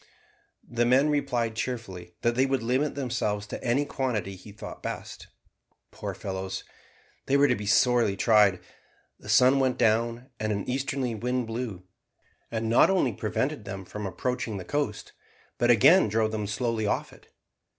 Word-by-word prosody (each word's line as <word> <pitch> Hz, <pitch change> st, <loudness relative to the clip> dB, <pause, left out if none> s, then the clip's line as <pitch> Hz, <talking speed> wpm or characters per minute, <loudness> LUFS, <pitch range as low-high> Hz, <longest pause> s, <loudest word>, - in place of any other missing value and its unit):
The 120 Hz, 0 st, 0 dB
men 130 Hz, +5 st, +4 dB
replied 125 Hz, -6 st, 0 dB
cheerfully 95 Hz, -8 st, -5 dB
that 120 Hz, -, +3 dB
they 130 Hz, +3 st, +2 dB
would 135 Hz, -3 st, 0 dB
limit 130 Hz, +5 st, 0 dB
themselves 115 Hz, -6 st, -2 dB
to -, -, -7 dB
any 125 Hz, +5 st, +1 dB
quantity 115 Hz, -9 st, -2 dB
he 95 Hz, +3 st, -13 dB
thought 105 Hz, -, -9 dB
best. -, -, -6 dB, 0.6 s
Poor -, -, -6 dB
fellows, 95 Hz, 0 st, -5 dB, 0.6 s
they 140 Hz, -, +3 dB
were 145 Hz, 0 st, +5 dB
to -, -, +3 dB
be 105 Hz, 0 st, -6 dB
sorely 115 Hz, -3 st, +3 dB
tried; 105 Hz, -4 st, +4 dB, 0.6 s
the -, -, -12 dB
sun 130 Hz, +2 st, +5 dB
went 130 Hz, -1 st, +1 dB
down, 115 Hz, +2 st, +1 dB
and 110 Hz, 0 st, -1 dB
an 100 Hz, -1 st, -3 dB
easterly 130 Hz, -1 st, -1 dB
wind 125 Hz, +3 st, -1 dB
blew, 110 Hz, -5 st, -5 dB, 0.7 s
and 115 Hz, 0 st, -2 dB
not 115 Hz, +10 st, +5 dB
only 180 Hz, -, +2 dB
prevented -, -, -2 dB
them 95 Hz, -1 st, -6 dB
from 105 Hz, +2 st, -5 dB
approaching 120 Hz, +3 st, -3 dB
the 90 Hz, -, -7 dB
coast, 145 Hz, -6 st, -3 dB, 0.5 s
but 120 Hz, -, +2 dB
again 120 Hz, -, +6 dB
drove 110 Hz, +1 st, +1 dB
them 105 Hz, -2 st, -3 dB
slowly 110 Hz, 0 st, -1 dB
off -, -, -2 dB
it. -, -, -19 dB
115 Hz, 160 wpm, -27 LUFS, 105-130 Hz, 0.7 s, again